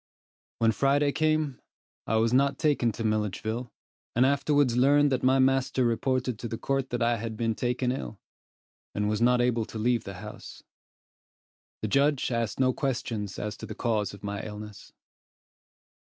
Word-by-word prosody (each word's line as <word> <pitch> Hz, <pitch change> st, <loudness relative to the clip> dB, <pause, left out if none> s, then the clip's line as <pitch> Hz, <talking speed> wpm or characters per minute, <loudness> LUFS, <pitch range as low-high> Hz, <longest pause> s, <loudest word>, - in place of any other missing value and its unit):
When 115 Hz, -1 st, +3 dB
Friday 140 Hz, +5 st, +2 dB
came, 155 Hz, -3 st, 0 dB, 0.5 s
I 110 Hz, -, +1 dB
was 115 Hz, +1 st, +2 dB
not 140 Hz, +2 st, +3 dB
taken 145 Hz, -7 st, +2 dB
to 115 Hz, -, -5 dB
Milledgeville, 110 Hz, +2 st, -2 dB, 0.4 s
and 125 Hz, +2 st, +5 dB
afterwards 140 Hz, -2 st, +2 dB
learned 145 Hz, +3 st, +4 dB
that 130 Hz, -, +1 dB
my 130 Hz, +1 st, +4 dB
master 135 Hz, -1 st, +2 dB
reported 125 Hz, 0 st, 0 dB
to 120 Hz, -, -4 dB
the 115 Hz, -, -4 dB
court 135 Hz, +1 st, -1 dB
that 120 Hz, -1 st, -1 dB
I 120 Hz, 0 st, +2 dB
had 110 Hz, 0 st, -5 dB
been 115 Hz, 0 st, 0 dB
taken 125 Hz, +2 st, -1 dB
ill, 125 Hz, -5 st, -5 dB, 0.8 s
and 105 Hz, 0 st, 0 dB
was 105 Hz, +1 st, -1 dB
not 125 Hz, +1 st, +4 dB
able 120 Hz, -2 st, +1 dB
to 110 Hz, -, -8 dB
leave 120 Hz, +1 st, +1 dB
the 100 Hz, -, -7 dB
house. 105 Hz, +3 st, -10 dB, 1.2 s
The -, -, +1 dB
judge 140 Hz, +3 st, +2 dB
asked 115 Hz, -1 st, -2 dB
no 130 Hz, -1 st, +3 dB
questions 115 Hz, -8 st, -3 dB
as 105 Hz, -1 st, -4 dB
to -, -, -8 dB
the -, -, -7 dB
cause 110 Hz, -5 st, 0 dB
of 100 Hz, 0 st, -13 dB
my 100 Hz, 0 st, -3 dB
illness. 105 Hz, -1 st, -9 dB
120 Hz, 165 wpm, -27 LUFS, 110-135 Hz, 1.2 s, and